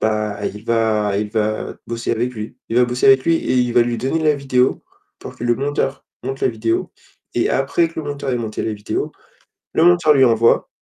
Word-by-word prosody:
bah, 105 -1 -1
il 105 +2 -7
va 110 -3 +1
il 105 0 -2
va 110 0 -2
bosser 115 0 -2
avec 120 +2 -1
lui. 110 +2 -7
Il 115 - -2
va 125 - +6
bosser 125 +1 0
avec 135 -1 +6
lui 165 - +3
et 130 - -1
il 125 -1 +2
va 120 - +6
lui 120 0 -2
donner 135 +7 -1
la 155 -1 +3
vidéo, 130 -2 +1 0.4
pour 130 - -9
que - - -11
le 120 0 +3
monteur, 140 0 -2 0.2
monte 135 +1 -4
la - - +4
vidéo. 115 -1 -2 0.4
Et - - +1
après 140 +5 +1
que 165 - -10
le 150 - -8
monteur 140 -1 -3
ait 125 - 0
monté 110 -2 -4
à - - -3
la 110 - -1
vidéo, 105 0 -3 0.6
le 160 - +3
monteur 175 -3 +5
lui 135 -2 +5
envoie 115 0 +3
120 Hz, 225 wpm, -19 LUFS, 110-135 Hz, 0.6 s, va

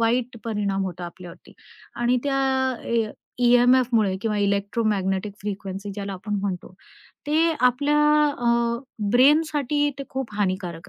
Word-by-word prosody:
वाईट 235 +1 0
परिणाम 200 -3 -1
होतो 180 -1 -6
आपल्यावरती. 175 0 -10 0.4
आणि 240 +1 +1
त्या 275 -1 0 0.5
अ 225 -2 0 0.3
ई-एम-एफमुळे 245 -4 +4
किंवा 215 -1 -1
इलेक्ट्रोमॅग्नेटिक 200 -1 0
फ्रिक्वेन्सी 200 0 -5
ज्याला 200 -1 -5
आपण 205 +3 -5
म्हणतो, 190 -2 -4 0.5
ते 320 +3 +3
आपल्या 285 +4 +3 0.4
अ, 235 0 +1 0.3
ब्रेनसाठी 290 +2 +3
ते - - -3
खूप 260 -5 -5
हानिकारक 185 -4 -3
220 Hz, 115 wpm, -24 LUFS, 195-250 Hz, 0.5 s, ई-एम-एफमुळे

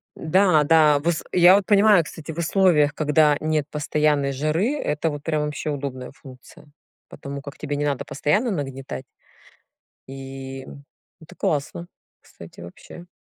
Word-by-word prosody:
Да-да, 160 -4 +3
вс 170 -2 -1
я 180 +1 +6
вот 200 - +1
понимаю, 205 -4 +5
кстати, 160 +1 -9
в 155 - -11
условиях, 165 -4 +2
когда 150 -1 +3
нет 155 -2 -1
постоянной 150 -2 0
жары, 155 - 0
это 150 - -2
вот 145 -1 -7
прям 155 -2 -1
вообще 150 +1 -4
удобная 135 -3 -5
функция. 130 -1 -16 0.4
Потому 140 0 -8
как 140 +2 -10
тебе 145 -1 -4
не 145 - -1
надо 140 -3 -1
постоянно 210 - 0
нагнетать. 135 - -5 1.1
И, 135 0 -8
м, 140 +1 -13 0.3
это 160 - -16
классно, 155 +3 -3 0.3
кстати, 85 0 -14
вообще. 90 - -12
150 Hz, 140 wpm, -22 LUFS, 140-165 Hz, 1.1 s, я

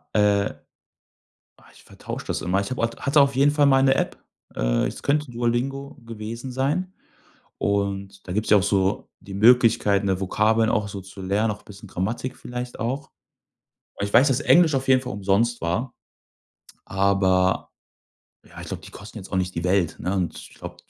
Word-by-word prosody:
Äh. 105 -1 +3 1.0
Ah, - - -21
ich - - -19
vertausche - - -8
das - - -2
immer. 90 +2 0
Ich 100 - -5
habe 130 - -2
au 115 - +4
hatte 140 +1 +3
auf 140 -1 +2
jeden 140 +2 +4
Fall 145 -1 +3
mal 135 -1 +5
'ne 135 0 +4
App. - - -1 0.4
Äh, - - +1
es - - -8
könnte 145 -1 0
Duolingo 125 +4 -2
gewesen 115 +3 -7
sein. 150 +9 -1 0.6
Und 100 -1 -2
da 90 - -4
gibt's 105 +2 -1
ja 105 - +7
auch 95 - +1
so 95 -1 0
die 100 - -11
Möglichkeit, 110 -2 +4
ne, 95 -2 0
Vokabeln 110 +4 +2
auch 105 -3 0
so 100 -1 -7
zu 95 +1 -11
lernen, 100 +4 0
auch 105 - -9
bisschen 105 0 -12
Grammatik 110 +8 -3
vielleicht 125 0 -7
auch. 135 +5 -3 0.9
Aber 100 - -2
ich 100 - -8
weiß, 130 +5 +6
dass 135 0 +1
Englisch 165 -2 +5
auf 135 0 -1
jeden 130 -1 +5
Fall 125 - -5
umsonst 105 +4 +1
war. 90 +10 -2 0.9
Aber 95 -1 +1 0.7
ja, - - -13
ich - - -8
glaube, - - -6
die - - -12
kosten 105 +3 -10
jetzt 95 - -11
auch 95 - 0
nicht 90 0 -1
die 85 - -3
Welt, 90 -2 +1
ne? 90 - -2
Und 90 -3 -2
ich - - -12
glaube, - - -9
105 Hz, 190 wpm, -24 LUFS, 95-130 Hz, 1.0 s, ja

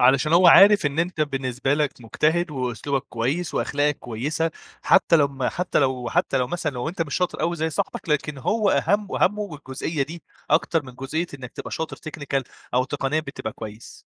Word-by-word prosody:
علشان 130 +4 +4
هو 175 +1 +6
عارف 200 0 +8
إن 145 +2 -3
أنت 170 -1 -1
بالنسبة 135 -2 0
لك 150 -2 0
مجتهد، 160 +9 0
وأسلوبك 130 0 -2
كويس، 135 +9 -2
وأخلاقك 145 0 0
كويسة، 145 +8 -2 0.3
حتى 165 - +5
لمّا 140 -4 +1
حتى 180 0 -1
لو 130 -4 0
حتى 135 - +1
لو 125 - +1
مثلًا 165 +1 -2
لو 125 +2 -3
أنت 165 0 -2
مش 145 - -5
شاطر 180 -1 -1
أوي 170 +1 0
زي 160 0 -1
صاحبك، 160 - -3
لكن 150 -1 0
هو 210 - +1
أهَم 205 0 +2
وهمّه 205 -4 0
الجزئية 140 +2 -3
دي 165 +4 -7 0.3
أكتر 165 -2 +2
من 130 - -11
جزئية 155 +7 -3
إنّك 130 -3 -9
تبقى - - -7
شاطر 160 - -4
technical 145 -3 -3 0.3
أو 130 +1 +3
تقنيًا 145 +2 -1
بتبقى 140 -7 -6
كويس. 110 0 -10
145 Hz, 185 wpm, -24 LUFS, 130-165 Hz, 0.3 s, عارف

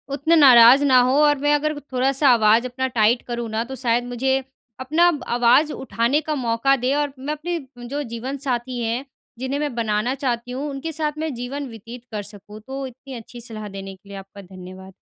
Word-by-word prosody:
उतने 315 +4 +2
नाराज़ 260 -2 +8
ना 260 -2 +6
हों 260 +2 +2
और 295 -1 +4
मैं 290 +2 +1
अगर 305 0 -1
थोड़ा-सा 270 0 +1
आवाज़ 225 0 +4
अपना 260 +1 -2
टाइट 225 +2 +3
करूँ 240 -1 -4
ना, 220 +1 -1
तो 265 +3 -8
शायद 240 -2 0
मुझे 265 +2 0 0.4
अपना 310 +7 +2 0.3
आवाज़ 245 +6 +4
उठाने 265 +2 0
का 305 - +1
मौका 245 +1 +1
दें 255 +1 -1
और 290 -1 -1
मैं 285 +3 -3
अपने 335 +3 -4 0.3
जो 285 +3 -3
जीवन 260 +4 -4
साथी 245 0 -2
हैं, 235 +4 -2 0.3
जिन्हें 260 +2 -3
मैं 295 -3 -2
बनाना 225 +2 -1
चाहती 245 -3 -3
हूँ, 275 +4 -4
उनके 280 +4 -5
साथ 305 -1 -3
मैं 315 -1 -3
जीवन 265 +4 -5
व्यतीत 230 +2 -11
कर 210 -2 -4
सकूँ। 205 +1 -12
तो 270 +1 -5
इतनी 260 +2 -12
अच्छी 240 +1 -10
सलाह 220 -2 -7
देने 195 0 -8
के 195 +1 -22
लिए 200 - -8
आपका 195 +1 -11
धन्यवाद। 185 0 -12
255 Hz, 200 wpm, -22 LUFS, 230-280 Hz, 0.4 s, नाराज़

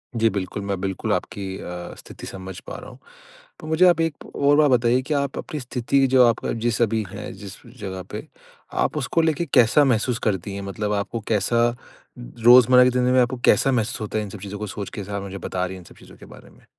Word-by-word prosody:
जी, 115 -1 +3
बिल्कुल। 100 -1 -4
मैं 100 -2 -2
बिल्कुल 95 -2 -2
आपकी 95 -1 -4
अ, 90 -1 -7
स्थिति - - -11
समझ 95 -1 -8
पा - - -6
रहा - - -11
हूँ। - - -15 0.6
तो 155 - -10
मुझे 160 +3 +4
आप 170 -2 +4
एक 165 -2 -3
और 145 +1 +3
बात 150 -2 +4
बताइए 120 0 +3
कि 150 - -2
आप 140 -1 -2
अपनी 150 - -6
स्थिति 130 +1 0
जो 130 -1 +5
आपका 115 - 0
जिस 120 0 0
अभी 110 -1 +1
हैं, 100 +2 -7
जिस 100 0 -10 0.2
जगह 95 -3 -6
पे, - - -6 0.5
आप - - 0
उसको 165 - +1
लेके 160 +1 0
कैसा 125 +4 +5
महसूस 125 -1 +1
करती 100 -1 -2
हैं? 100 - -5
मतलब 105 +2 -3
आपको 105 +3 -2
कैसा 115 +2 +2 0.5
रोज़मर्रा 120 - +6
की 125 - +4
ज़िंदगी 125 0 +1
में 130 - +5
आपको 125 +1 0
कैसा 135 - +4
महसूस 120 -1 -1
होता 110 0 -3
है 105 - -1
इन 105 - -7
सब 100 - -9
चीज़ों 100 +1 -7
को 105 - -4
सोच 100 +1 -6
के, - - -7
जैसा 100 +1 -5
आप 100 - -5
मुझे 100 0 -7
बता 90 -1 -3
रही 95 +1 -6
हैं - - -10
इन - - -17
सब - - -16
चीज़ों - - -16
के - - -14
बारे - - -15
में? - - -22
115 Hz, 240 wpm, -23 LUFS, 100-125 Hz, 0.6 s, रोज़मर्रा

